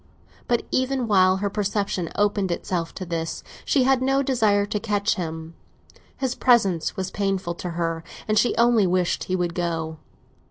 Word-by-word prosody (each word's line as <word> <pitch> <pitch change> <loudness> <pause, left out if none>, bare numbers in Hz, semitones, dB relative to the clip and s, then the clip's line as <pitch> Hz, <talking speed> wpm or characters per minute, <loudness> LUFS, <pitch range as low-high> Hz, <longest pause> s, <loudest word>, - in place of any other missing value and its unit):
But 240 -1 +1
even 260 -1 0
while 185 -2 +4
her 200 +1 -1
perception 200 -4 -1
opened 205 -2 +1
itself 170 -1 -2
to 185 - -5
this, 165 -1 -4 0.2
she 270 - +3
had 265 0 +3
no 270 +1 +2
desire 215 -6 +2
to 210 +1 -2
catch 205 0 0
him; 160 -3 -5 0.6
his 260 -2 -1
presence 200 -11 +2
was 190 0 -3
painful 195 -3 -1
to 180 - -3
her, 165 -1 -1 0.2
and 215 - +1
she 240 - +3
only 235 -4 +4
wished 180 0 0
he 185 - -1
would 175 -2 -1
go. 165 -2 -3
195 Hz, 165 wpm, -24 LUFS, 175-225 Hz, 0.6 s, while